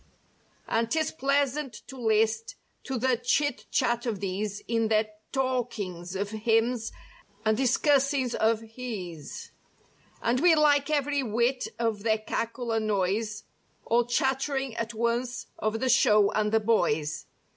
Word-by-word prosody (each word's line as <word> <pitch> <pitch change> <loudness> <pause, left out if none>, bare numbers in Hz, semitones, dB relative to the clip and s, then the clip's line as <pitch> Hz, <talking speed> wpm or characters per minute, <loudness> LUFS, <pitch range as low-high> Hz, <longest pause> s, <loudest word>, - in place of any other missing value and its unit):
And 230 0 0
'tis 315 +4 0
pleasant 280 -3 -1
to 270 - -10
list 225 -1 +1 0.3
to 265 - -2
the 255 +1 +2
chit 265 +4 0
chat 240 -2 +1
of 215 -4 -2
these 200 +2 -3
In 230 -1 +1
their 215 0 +1 0.2
talkihgs 215 -9 -2
of 200 +1 -2
"hims" 225 +1 +1 0.5
and 220 0 +3
discussings 270 +1 +2
of 225 0 +2
"hes 220 - -7 0.7
141 - - -17
And 240 +2 +2
we 340 +2 +6
like 290 -1 +3
every 290 -1 +1
whit 240 +2 0
of 225 -3 -1
their 220 0 +2
cackle 230 +2 -3
and 220 -1 0
noise, 210 +2 -1 0.4
All 235 +1 +3
chatt'ring 265 +1 0
at 230 0 -4
once 235 +2 -1
of 215 +1 -1
the 260 - 0
show 210 -5 +5
and 210 0 0
the 225 - +4
boys. 165 -9 0
230 Hz, 140 wpm, -27 LUFS, 215-260 Hz, 0.7 s, we